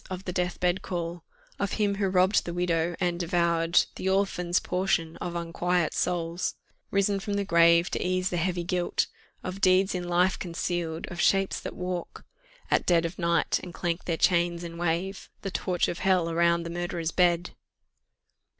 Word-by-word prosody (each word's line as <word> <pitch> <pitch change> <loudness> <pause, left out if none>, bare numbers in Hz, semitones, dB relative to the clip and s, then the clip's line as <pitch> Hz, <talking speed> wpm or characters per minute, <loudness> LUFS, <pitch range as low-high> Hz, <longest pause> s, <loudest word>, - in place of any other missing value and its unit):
of 185 0 -6
the 180 - -3
deathbed 180 0 0
call 170 -1 -4 0.4
Of 200 - -1
him 205 -2 +1
who 200 -1 +1
robb'd 185 +2 +3
the 170 - -4
widow, 170 -1 0
and 175 -2 0
devour'd 170 -1 +2
The 190 - -1
orphan's 190 -2 +1
portion 180 -3 -1
of 175 -1 -5
unquiet 170 0 0
souls 170 0 -1 0.4
Ris'n 200 0 +2
from 205 -1 -3
the 200 0 -1
grave, 170 -1 +5
to - - -1
ease 185 0 0
the 175 - -1
heavy 175 0 -1
guilt 175 0 0 0.4
Of 185 +2 -5
deeds 185 +1 +4
in 175 -1 -3
life 180 +2 +2
conceal'd 170 -1 -3
of 175 0 -3
shapes 195 -1 +2
that - - -7
walk 180 -1 -5 0.5
At - - +2
dead 170 -2 +4
of 170 +2 -5
night, 170 -1 +1
and 175 -2 -9
clank 170 0 -2
their 165 -2 -1
chains, 170 -1 +2
and 170 0 -7
wave 175 +3 -2
The 195 - -3
torch 180 -1 0
of 170 - -4
Hell 185 -3 +2
around 170 0 +2
the 170 - -6
murderer's 175 -1 -3
bed!" 175 -1 +2
175 Hz, 175 wpm, -27 LUFS, 170-185 Hz, 0.5 s, grave